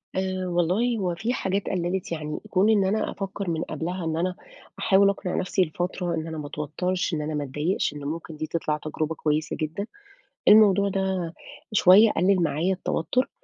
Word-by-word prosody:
آآ 185 -1 -1
والله 180 +8 +1
هو 180 -3 -1
في 225 +7 -2
حاجات 195 -3 -1
قَلِّلِت 180 0 -2
يعني، 155 -2 -4
كون 195 +2 +3
إن 205 -3 +4
أنا 210 +3 0
أفكَّر 195 -1 -4
من 165 0 -1
قبلها 180 +1 -4
إن 160 0 -1
أنا 180 +2 -1 0.4
أحاول 200 -1 +4
أقنع 195 -2 -2
نَفْسي 185 +1 0
لفترة 175 +1 -3
إن 160 0 -4
أنا 160 -1 -5
ما 150 -1 -5
أتوترش، 180 +6 -2
إن 155 - -1
أنا 155 +1 -3
ما 150 -1 -1
أتضايقش، 150 +5 -1
إن 145 - -7
ممكن 160 +2 -5
دي 155 - -3
تِطْلِع 155 -2 -1
تجربة 155 +1 -3
كويسة 155 0 -1
جدًا. 165 +6 -3 0.6
الموضوع 200 -2 +6
ده 190 -3 -2 0.4
شوية 210 +2 +7
قلل 185 0 +2
معايا 165 +3 +1
التوتر. 185 +7 -1
180 Hz, 180 wpm, -25 LUFS, 160-195 Hz, 0.6 s, شوية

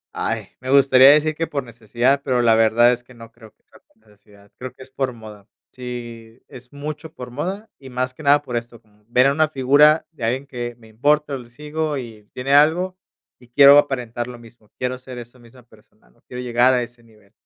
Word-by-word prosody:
Ay, 110 -3 -3
me 130 - -8
gustaría 135 -1 +6
decir 155 +1 +4
que 165 +2 -3
por 140 -2 -4
necesidad, 120 +3 -1
pero 125 -3 0
la 115 -1 +4
verdad 115 +2 +4
es 120 0 -7
que 125 +1 -18
no 115 -1 -13
creo 115 -2 -17
que - - -47
sea - - -22
por - - -39
necesidad, 105 -1 -23
creo 130 -1 -7
que 130 - -14
es 130 - -18
por 135 -1 -2
moda, 110 -3 -13 0.2
sí, 120 -2 -9
es 125 +1 -14
mucho 150 +2 -7
por 125 -1 -9
moda 190 - -5
y 135 -1 -12
más 125 0 -3
que 155 - -14
nada 145 0 +3
por 125 -4 -6
esto, 115 0 -5
como 105 -1 -31
ver 125 +2 +3
a 135 - +4
una 155 +2 +2
figura 145 +3 +4
de 150 - -11
alguien 130 +5 -1
que 120 -3 -6
me 115 -2 -18
importa, 145 +6 0
o 135 - -3
le 120 -1 -14
sigo, 150 +3 -4
y 110 -4 -10
tiene 135 +2 -3
algo 165 +6 +3 0.4
y 125 - -19
quiero 140 +3 +7
aparentar 125 -4 -3
lo 125 -1 -9
mismo, 115 -2 -19
quiero 125 0 -3
ser 130 -1 -11
esa 120 +1 -11
misma 120 +1 -18
persona, 110 -2 -25
¿no?, - - -33
quiero 125 0 -7
llegar 125 +1 +3
a 125 - 0
ese 120 0 -13
nivel. 110 -4 -24
125 Hz, 225 wpm, -20 LUFS, 115-140 Hz, 0.4 s, quiero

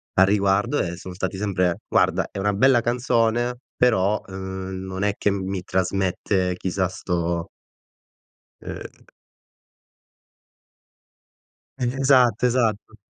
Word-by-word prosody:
a 95 - +6
riguardo 100 +6 +2
e 85 0 -3
son 90 0 -8
stati 95 +1 -3
sempre: 90 -3 0
"Guarda, 95 -2 +2
è - - -9
una 105 +1 +1
bella 120 +4 +4
canzone 120 0 +1 0.2
però, 105 -4 +3
ehm, 95 0 -6
non 95 +1 -4
è 105 - +2
che 105 - +1
mi 95 -1 -3
trasmette 95 0 0
chissà 95 0 -1
sto" 85 -2 -2 1.1
ehm - - -9 2.7
E 125 - -3 0.2
esatto, 125 -4 +4
esatto. 115 -3 0
95 Hz, 110 wpm, -23 LUFS, 95-115 Hz, 2.7 s, a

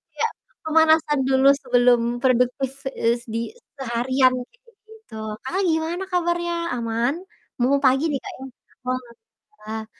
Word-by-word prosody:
Iya, - - 0 0.4
pemanasan 315 -2 +4
dulu 265 0 +4
sebelum 245 -1 +4 0.2
produktif 255 +1 +2 0.3
es 235 +1 +2
di 230 - 0 0.4
seharian 255 +1 +2 0.2
gitu-gitu. 445 - -20 0.3
Kakak 370 +9 -1
gimana 325 +4 -1
kabarnya, 345 -1 0 0.2
aman? 230 +2 0 0.5
Mumpung 275 +3 +2
pagi 270 +4 +3
nih, 275 - -1
Kak, - - -7
ya. - - -14 0.4
Wah, 255 0 0 0.4
alhamdulillah. 220 - -8
265 Hz, 120 wpm, -23 LUFS, 245-325 Hz, 0.5 s, pemanasan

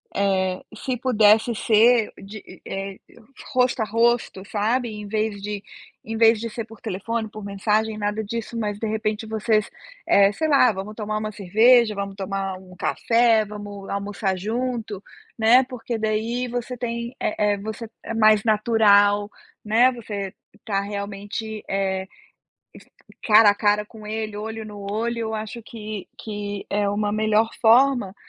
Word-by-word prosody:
eh, 190 -2 +1
se 255 +4 -3
pudesse 225 -2 +4
ser 225 +1 +4
de 205 +2 -11
eh 195 0 -4
eh, - - -23
e - - -20 0.4
rosto 250 -2 +2
a - - +1
rosto, 230 -2 +1
sabe, 225 +5 0
em 210 -1 -7
vez 215 -1 -2
de 205 0 -5 0.4
em 225 - -4
vez 225 0 +5
de 230 +1 -4
ser 230 +1 -5
por 225 0 -14
telefone, 220 +2 -3
por 215 0 -9
mensagem, 210 +2 0
nada 210 +1 -2
disso, 230 +2 -5
mas 210 -2 -2
de 225 - -2
repente 215 0 -2
vocês 220 -1 0 0.4
eh, 200 0 +5
sei 315 +8 -1
lá: 275 -5 +5
"Vamos 200 +2 -7
tomar 215 -1 -3
uma 215 0 -4
cerveja, 215 +3 +4
vamos 200 0 -4
tomar 195 -1 -3
um 185 -1 -15
café, 230 +2 +3
vamos 205 -1 -8
almoçar 200 -1 -2
junto", 220 0 -3 0.3
né, 235 +3 +6
porque 245 -2 -5
daí 220 +3 -1
você 245 +1 -4
tem 235 0 -4
eh - - -1 0.2
eh, - - -8
você 220 +2 -6
é - - -5
mais 215 -2 +4
natural, 205 -2 +4 0.4
né, 230 +4 +4
você 205 -5 -6 0.3
tá 195 -2 0
realmente, 205 +2 -5
eh, 190 -1 -1 1.0
es - - -21
cara 215 -1 +7
a - - 0
cara 210 0 +2
com 215 -1 -12
ele, 215 -1 -4
olho 220 +1 -5
no 210 -1 -9
olho, 230 +2 -1
eu 220 -1 -3
acho 220 +2 -6
que 215 -2 -8
que 205 -2 -5
é 205 0 +1
uma 205 +1 -1
melhor 215 +1 +2
forma 240 -3 +4
215 Hz, 160 wpm, -23 LUFS, 205-230 Hz, 1.0 s, cara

